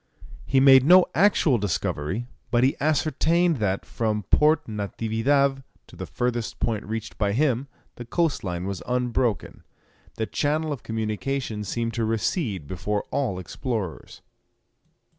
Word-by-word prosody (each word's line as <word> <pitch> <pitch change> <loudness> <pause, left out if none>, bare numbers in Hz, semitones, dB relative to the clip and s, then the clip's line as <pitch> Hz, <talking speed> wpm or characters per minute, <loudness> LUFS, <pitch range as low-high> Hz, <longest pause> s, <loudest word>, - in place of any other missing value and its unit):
He 135 - +3
made 135 -1 +7
no 180 +5 +7
actual 165 - +3
discovery, 95 +1 -2 0.2
but 120 0 +2
he 135 - +3
ascertained 160 +2 +2
that, 100 -4 -1
from 110 -2 -2
Port 150 0 +4
Natividad 115 +6 0 0.2
to - - -16
the - - -7
furthest 120 -2 -2
point 110 -3 -1
reached 110 +1 -5
by 100 -2 +1
him, 135 0 +1 0.3
the 120 - -7
coast 165 +4 0
line 90 -1 -3
was 95 -2 -4
unbroken. 125 -2 -1 0.5
The 115 -1 -2
channel 155 +5 -1
of 135 - -8
communication 110 +1 -3
seemed 115 +2 -3
to 115 - -1
recede 110 - -1
before 100 +6 -3
all 130 -10 -1
explorers. 95 - -5
120 Hz, 135 wpm, -25 LUFS, 105-140 Hz, 0.5 s, made